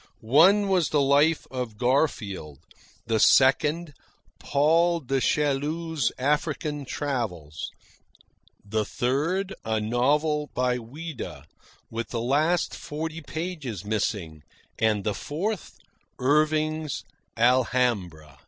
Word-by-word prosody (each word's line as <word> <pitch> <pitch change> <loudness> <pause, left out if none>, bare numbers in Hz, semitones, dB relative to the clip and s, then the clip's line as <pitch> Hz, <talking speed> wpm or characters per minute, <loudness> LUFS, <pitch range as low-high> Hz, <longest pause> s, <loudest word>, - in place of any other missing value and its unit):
One 195 +7 +6
was 185 -4 +2
the 150 - +2
life 145 +3 +3
of 125 -5 -4
Garfield; 110 - 0 0.5
the 115 -1 +1
second, 150 +7 +4 0.5
Paul 165 +4 +3
du 135 -2 -1
Chaillu's 150 +1 0
African 150 +1 -1
travels; 110 - -4 1.0
the 110 +1 0
third, 165 - -1
a 110 -1 0
novel 145 +7 +1
by 125 0 +1
Ouida 145 +5 -8 0.5
with 115 +1 -4
the 120 - -3
last 150 +8 +1
forty 160 +2 -5
pages 150 - -5
missing; 100 -7 -2 0.4
and 110 -2 +2
the 105 - 0
fourth, 175 - -4 0.4
Irving's 155 +2 +1 0.3
"Alhambra." 115 - +1
140 Hz, 95 wpm, -26 LUFS, 115-155 Hz, 1.0 s, One